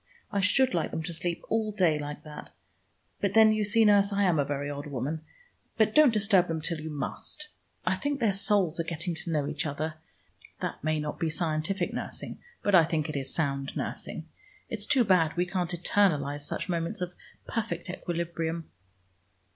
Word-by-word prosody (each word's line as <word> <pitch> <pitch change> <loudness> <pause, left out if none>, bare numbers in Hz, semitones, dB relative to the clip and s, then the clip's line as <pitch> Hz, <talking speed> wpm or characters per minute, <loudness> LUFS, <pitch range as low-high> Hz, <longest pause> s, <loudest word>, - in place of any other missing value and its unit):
"I 200 - 0
should 230 +6 +4
like 170 -3 0
them 160 - -4
to 170 +1 -4
sleep 170 +1 -2
all 220 -1 0
day 175 -7 +2
like 145 0 -6
that. 150 -1 -9 0.7
But 200 0 0
then, 220 -1 +7
you 215 0 +1
see, 220 +2 +4
nurse, 205 -1 +5
I 200 0 +2
am 175 -5 +3
a - - +4
very 145 0 -3
odd 145 0 -5
woman. 145 +3 -3 0.6
But 220 -1 +3
don't 300 -4 +7
disturb 200 -4 +4
them 165 -1 -2
till 160 0 -2
you 160 - -5
must. 155 - -4 0.4
I - - +2
think 285 -1 -1
their 220 -5 +2
souls 195 -4 +2
are - - +2
getting 170 +1 -2
to 165 +1 -3
know 150 -3 0
each - - -2
other. 155 +2 -3 0.7
That - - -4
may 155 0 +1
not 150 0 -4
be 165 - 0
scientific 165 +3 -1
nursing, - - -5 0.2
but 205 - +1
I 175 -3 +8
think 160 -1 -1
it 155 - -4
is 135 -1 -3
sound 140 -3 -1
nursing. - - -4 0.4
It's 215 -2 -3
too 270 -4 +4
bad 175 -6 +3
we 175 - +2
can't 180 -1 -2
eternalize 155 -5 +1
such - - -3
moments 170 +4 -2
of 180 0 -3 0.3
perfect 230 -2 -3
equilibrium." 170 -2 -3
170 Hz, 190 wpm, -28 LUFS, 155-205 Hz, 0.7 s, I